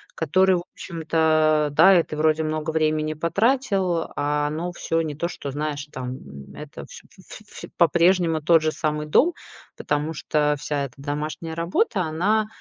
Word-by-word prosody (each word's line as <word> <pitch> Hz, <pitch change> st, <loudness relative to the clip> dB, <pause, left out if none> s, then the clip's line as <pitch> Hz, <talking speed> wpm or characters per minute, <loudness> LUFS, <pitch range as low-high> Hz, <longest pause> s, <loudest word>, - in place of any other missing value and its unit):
который, 185 Hz, +4 st, +3 dB
в 175 Hz, -, -3 dB
общем-то, 155 Hz, -2 st, +1 dB
да, 190 Hz, +3 st, +6 dB
и -, -, +5 dB
ты 155 Hz, -, -7 dB
вроде 155 Hz, 0 st, +2 dB
много 155 Hz, 0 st, -2 dB
времени 155 Hz, -1 st, 0 dB
потратил, 190 Hz, -, 0 dB
а 145 Hz, 0 st, 0 dB
оно 165 Hz, +4 st, -3 dB
всё 165 Hz, -1 st, -1 dB
не 155 Hz, -2 st, -3 dB
то, 160 Hz, +4 st, -3 dB
что 145 Hz, -5 st, -7 dB
знаешь, 145 Hz, 0 st, -4 dB
там, 130 Hz, 0 st, -6 dB, 0.4 s
это -, -, -9 dB
всь -, -, -12 dB, 0.2 s
ф -, -, -13 dB
всь -, -, -10 dB
по-прежнему 170 Hz, 0 st, +3 dB
тот 165 Hz, +1 st, +4 dB
же 155 Hz, -, +1 dB
самый 150 Hz, 0 st, -2 dB
дом. 320 Hz, -, +3 dB, 0.4 s
Потому 150 Hz, +2 st, -2 dB
что 150 Hz, -1 st, 0 dB
вся 145 Hz, -1 st, -2 dB
эта 125 Hz, -, -11 dB
домашняя 150 Hz, +3 st, -5 dB
работа, 175 Hz, +5 st, 0 dB
она, 190 Hz, +7 st, 0 dB
155 Hz, 160 wpm, -23 LUFS, 150-170 Hz, 0.4 s, да